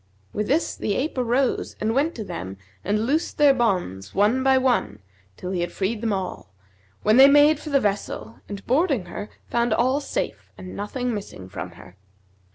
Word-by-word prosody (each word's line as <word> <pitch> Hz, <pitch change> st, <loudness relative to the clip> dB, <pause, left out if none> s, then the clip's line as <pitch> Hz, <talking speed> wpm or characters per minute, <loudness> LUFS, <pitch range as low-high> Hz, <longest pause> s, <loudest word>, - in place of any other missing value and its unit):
With 210 Hz, 0 st, -2 dB
this 300 Hz, +6 st, +1 dB
the 205 Hz, -, -2 dB
ape 295 Hz, +5 st, -1 dB
arose 250 Hz, +1 st, 0 dB
and 220 Hz, +1 st, 0 dB
went 280 Hz, +5 st, +3 dB
up 330 Hz, -, -10 dB
to 220 Hz, -, -4 dB
them 95 Hz, -, -6 dB, 0.3 s
and 210 Hz, +3 st, 0 dB
loosed 300 Hz, +6 st, 0 dB
their 290 Hz, -2 st, +6 dB
bonds 180 Hz, -, -1 dB
one 215 Hz, +6 st, +3 dB
by 265 Hz, 0 st, +4 dB
one, 255 Hz, -, +1 dB, 0.4 s
till 180 Hz, -, -5 dB
he 180 Hz, -2 st, -1 dB
had 175 Hz, -, -2 dB
freed 210 Hz, +3 st, -2 dB
them 230 Hz, -2 st, 0 dB
all, 185 Hz, -, -4 dB, 0.5 s
when 215 Hz, +3 st, +4 dB
they 270 Hz, +1 st, +10 dB
made 290 Hz, +1 st, +6 dB
for 305 Hz, -, -7 dB
the 280 Hz, -1 st, +4 dB
vessel 195 Hz, -, -3 dB
and 200 Hz, -1 st, -7 dB
boarding 270 Hz, -, +2 dB
her, 205 Hz, +4 st, -7 dB, 0.2 s
found 235 Hz, -1 st, +1 dB
all 260 Hz, +4 st, +2 dB
safe -, -, -4 dB
and 185 Hz, -, -9 dB
nothing 245 Hz, +4 st, -3 dB
missing 195 Hz, -, -7 dB
from 90 Hz, -2 st, -7 dB
her. 90 Hz, +2 st, -15 dB
225 Hz, 190 wpm, -24 LUFS, 190-265 Hz, 0.5 s, they